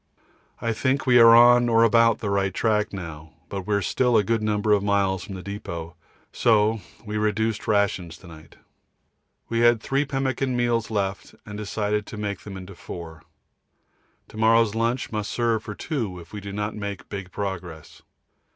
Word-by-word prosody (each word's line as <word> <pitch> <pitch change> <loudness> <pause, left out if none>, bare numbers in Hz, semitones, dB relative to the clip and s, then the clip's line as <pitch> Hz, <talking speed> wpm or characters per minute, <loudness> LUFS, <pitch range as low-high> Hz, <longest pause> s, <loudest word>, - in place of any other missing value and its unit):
I 115 -1 -1
think 130 +4 0
we 125 -2 +6
are 115 0 +9
on 120 0 +6
or 115 0 +5
about 115 0 +4
the 100 - -2
right 100 -1 +1
track 105 -2 +1
now, 80 -5 -8 0.2
but 95 -2 -5
we 105 - +1
are 100 - 0
still 125 +7 +2
a 105 - +3
good 115 +2 0
number 105 0 0
of 105 -1 +4
miles 100 -2 +1
from 95 - -8
the 90 - -8
depôt, 85 -5 -6 0.4
so 110 -1 +2 0.2
we 105 0 -3
reduced 110 +1 -1
rations 95 -5 0
to 95 - -17
night. 80 -1 -14 0.9
We 115 - -1
had 120 -1 +5
three 135 +5 0
pemmican 135 -2 -1
meals 120 -2 0
left 100 -3 -3
and 105 - -8
decided 105 0 -2
to 110 - -8
make 100 -3 -3
them 95 0 -9
into 95 +1 -9
four. 85 -3 -9 1.1
To - - -12
morrow's 115 -1 +4
lunch 115 +3 -1
must 105 -2 -3
serve 115 -2 0
for 105 -2 -7
two 115 - -3
if 85 +2 -14
we 105 - -6
do 100 0 -7
not 105 +1 -3
make 100 -2 -6
big 100 -3 -7
progress. 90 -6 -6
105 Hz, 180 wpm, -24 LUFS, 95-115 Hz, 1.1 s, are